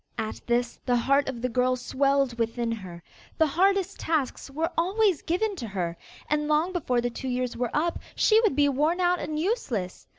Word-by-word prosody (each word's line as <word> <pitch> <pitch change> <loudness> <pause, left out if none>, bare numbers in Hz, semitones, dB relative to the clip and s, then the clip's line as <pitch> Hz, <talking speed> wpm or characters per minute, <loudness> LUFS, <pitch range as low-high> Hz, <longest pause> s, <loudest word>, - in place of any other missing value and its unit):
At 220 - -4
this, 240 0 0
the 245 - +1
heart 275 +3 +2
of 240 -2 -6
the - - +2
girl 255 +1 +2
swelled 270 0 +1
within 230 +1 -1
her. 185 -6 -7 0.3
The 320 - +5
hardest 380 +5 +1
tasks 305 -4 -1
were 315 +4 -2
always 380 +1 +2
given 400 +5 0
to 235 - -5
her, 180 -4 -3 0.3
and 300 0 0
long 310 +4 +2
before 255 -9 0
the 245 0 -1
two 260 - -6
years 250 -1 -2
were 245 0 -1
up, 335 +3 0 0.2
she 435 0 +5
would 435 - +2
be 290 0 +4
worn 300 +6 +1
out 355 0 +2
and 305 0 -3
useless. 275 - -2
275 Hz, 195 wpm, -26 LUFS, 240-335 Hz, 0.3 s, The